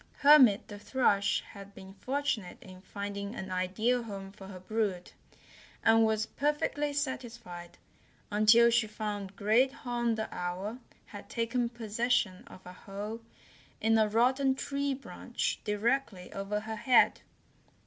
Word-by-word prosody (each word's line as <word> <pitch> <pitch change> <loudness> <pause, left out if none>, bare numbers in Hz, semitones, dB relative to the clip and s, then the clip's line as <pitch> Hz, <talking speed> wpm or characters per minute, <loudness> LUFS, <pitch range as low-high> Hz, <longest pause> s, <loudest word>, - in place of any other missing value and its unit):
Hermit 275 -8 +6
the 205 -1 -9
Thrush 205 -4 +1
had 200 0 -12
been 190 0 -11
fortunate 260 -5 -2
in 185 -1 -13
finding 200 +2 -6
an 190 -3 -6
ideal 205 +7 0
home 195 -4 -7
for 195 -1 -12
her 190 -2 -9
brood, 195 -2 -2 0.7
and 225 0 +5
was 220 -1 +1
perfectly 295 +2 -1
satisfied 235 - -5 0.5
until 220 +3 +6
she 235 -1 +2
found 205 -2 -5
Great 220 +7 +3
Horn 240 -3 -2
the 220 0 -3
Owl 185 +6 -4 0.3
had - - -11
taken 235 +1 -1
possession 230 -3 -1
of 185 - -14
a 180 - -9
hole 205 +4 -7 0.6
in 225 +1 +3
a 215 - +4
rotten 260 +5 +2
tree 280 0 -2
branch - - -4
directly 210 -2 -1
over 200 +1 -3
her 220 +1 -6
head. 240 +3 +4
220 Hz, 135 wpm, -30 LUFS, 200-245 Hz, 0.7 s, Hermit